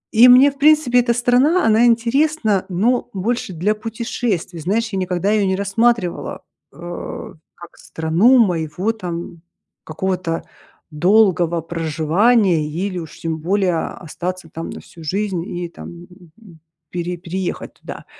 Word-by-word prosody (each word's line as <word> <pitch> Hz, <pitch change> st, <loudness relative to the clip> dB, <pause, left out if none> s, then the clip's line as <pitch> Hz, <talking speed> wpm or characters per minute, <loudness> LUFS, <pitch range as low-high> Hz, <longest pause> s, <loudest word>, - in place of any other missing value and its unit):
И 240 Hz, +3 st, +8 dB
мне, 260 Hz, +3 st, +8 dB
в 275 Hz, -, -20 dB
принципе, 300 Hz, -4 st, +4 dB
эта 235 Hz, -1 st, +1 dB
страна, 250 Hz, +9 st, +3 dB
она 225 Hz, +2 st, +4 dB
интересна, 235 Hz, -2 st, +2 dB
но 225 Hz, +8 st, +1 dB
больше 200 Hz, 0 st, -2 dB
для 190 Hz, +6 st, 0 dB
путешествий. 215 Hz, -5 st, -4 dB
Знаешь, 215 Hz, +6 st, -1 dB
я 190 Hz, -, -1 dB
никогда 180 Hz, +1 st, -2 dB
её 210 Hz, -2 st, +2 dB
не 190 Hz, -, +1 dB
рассматривала, 200 Hz, -1 st, 0 dB, 0.3 s
а, 175 Hz, +1 st, -8 dB, 0.2 s
как 175 Hz, -1 st, -14 dB
страну 170 Hz, +11 st, +2 dB
моего 180 Hz, -1 st, +1 dB
там 175 Hz, -5 st, -7 dB, 0.4 s
какого-то 175 Hz, 0 st, -3 dB, 0.5 s
долгого 175 Hz, 0 st, +3 dB
проживания 165 Hz, +4 st, +1 dB, 0.2 s
или 185 Hz, -3 st, -4 dB
уж 160 Hz, -3 st, -10 dB
тем 160 Hz, -1 st, -2 dB
более 180 Hz, 0 st, 0 dB
остаться 180 Hz, +1 st, -6 dB
там 165 Hz, -, -6 dB
на -, -, -7 dB
всю 165 Hz, -, -15 dB
жизнь 190 Hz, +2 st, -2 dB
и 175 Hz, 0 st, -5 dB
там, -, -, -10 dB, 0.5 s
м, 180 Hz, -8 st, -17 dB, 0.3 s
пере 175 Hz, 0 st, -3 dB
переехать 180 Hz, +2 st, -5 dB
туда. -, -, -10 dB
190 Hz, 135 wpm, -19 LUFS, 170-230 Hz, 0.5 s, И